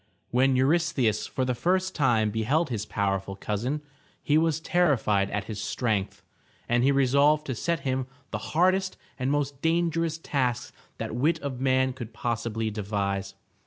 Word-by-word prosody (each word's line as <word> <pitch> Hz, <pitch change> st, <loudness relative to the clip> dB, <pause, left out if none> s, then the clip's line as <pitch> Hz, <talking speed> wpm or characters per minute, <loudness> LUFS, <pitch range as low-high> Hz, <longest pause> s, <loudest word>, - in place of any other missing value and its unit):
When 130 Hz, +2 st, +3 dB
Eurystheus 135 Hz, -, +2 dB
for 130 Hz, -, -2 dB
the 125 Hz, -, 0 dB
first 185 Hz, +9 st, 0 dB
time 115 Hz, -6 st, +2 dB
beheld 130 Hz, +9 st, 0 dB
his 110 Hz, -2 st, -3 dB
powerful 95 Hz, -1 st, -1 dB
cousin, 120 Hz, +10 st, -3 dB, 0.4 s
he 145 Hz, -, +2 dB
was 160 Hz, 0 st, +2 dB
terrified 135 Hz, -, +2 dB
at 105 Hz, 0 st, -2 dB
his 105 Hz, -1 st, -6 dB
strength, 105 Hz, -6 st, -2 dB, 0.4 s
and 120 Hz, +1 st, +2 dB
he 140 Hz, -, +4 dB
resolved 140 Hz, +3 st, +3 dB
to 130 Hz, -, -2 dB
set 165 Hz, +6 st, -1 dB
him 130 Hz, -1 st, -1 dB, 0.2 s
the -, -, -2 dB, 0.2 s
hardest 185 Hz, +2 st, +2 dB, 0.2 s
and 130 Hz, +1 st, 0 dB
most 140 Hz, -1 st, -1 dB
dangerous 165 Hz, -1 st, +1 dB
tasks 125 Hz, -6 st, -1 dB, 0.2 s
that -, -, -4 dB
wit 150 Hz, +7 st, +1 dB
of 130 Hz, -3 st, -4 dB
man 130 Hz, 0 st, +2 dB
could 120 Hz, -3 st, -8 dB
possibly 115 Hz, -1 st, -2 dB
devise. 100 Hz, -2 st, -2 dB
130 Hz, 155 wpm, -27 LUFS, 110-150 Hz, 0.4 s, he